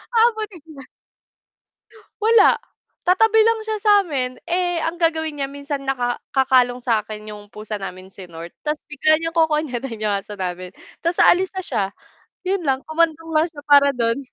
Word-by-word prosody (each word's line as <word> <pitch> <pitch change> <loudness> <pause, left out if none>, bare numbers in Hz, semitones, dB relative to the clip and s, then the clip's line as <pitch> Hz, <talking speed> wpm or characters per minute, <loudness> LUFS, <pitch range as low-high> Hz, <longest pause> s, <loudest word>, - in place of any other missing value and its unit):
Ah, 460 +1 +6
buti 430 -4 -6
na - - -22
nga. 270 - -10 1.4
Wala, 440 -1 +5 0.5
tatabi 445 +4 +5
lang 455 0 +2
siya 435 -1 -2
sa'min, 325 -12 +3 0.3
eh, 350 -1 -1
ang 325 +1 -2
gagawin 320 -2 0
niya 275 - -2
minsan, 285 0 -4
naka 255 -2 -1 0.3
kakalong 255 -2 +3
sa'kin 215 -2 -1
yung 205 0 -12
pusa 215 0 -6
namin, 185 -1 -7
si 195 - -10
North, 165 +1 -9
tas 300 0 0
bigla 300 +1 +3
niyang 330 +1 -4
kokonyatin 285 -7 0
yung 210 -1 +1
aso 200 +1 -8
namin, 180 -1 -4 0.3
tas 335 +1 0
aalis 370 +1 +4
na - - -1
siya. 225 -6 0 0.6
'Yon 385 -1 0
lang, 265 -1 +2
kumandong 325 0 0
lang 310 +1 +4
siya 300 -3 -11
para 280 0 +7
do'n. 230 0 0
285 Hz, 170 wpm, -21 LUFS, 230-335 Hz, 1.4 s, para